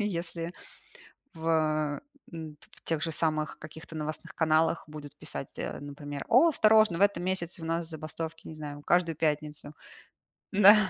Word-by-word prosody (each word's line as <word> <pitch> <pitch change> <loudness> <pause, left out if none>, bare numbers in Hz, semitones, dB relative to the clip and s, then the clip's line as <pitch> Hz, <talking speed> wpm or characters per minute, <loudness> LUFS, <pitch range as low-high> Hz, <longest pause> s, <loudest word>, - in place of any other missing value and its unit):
Если 170 -4 -2 0.8
в 155 -2 +1 0.3
м, 155 -2 -7
в - - -15
тех 160 -2 0
же 165 - -1
самых 155 -1 0
каких-то 160 +1 -10
новостных 155 +3 -5
каналах 160 +1 +3
будут 150 -2 -9
писать, - - -5
э, - - -3
например: 145 0 -6
"О, 255 +8 +7
осторожно, 215 - +5
в - - -1
этом 200 -4 +4
месяце 180 -2 -2
у - - -5
нас 165 0 -1
забастовки, 160 +1 -5
не 160 - -7
знаю, 145 -1 -7
каждую 170 -2 +3
пятницу". 150 -1 0 0.8
Да. 205 +1 +9
160 Hz, 150 wpm, -30 LUFS, 155-170 Hz, 0.8 s, Да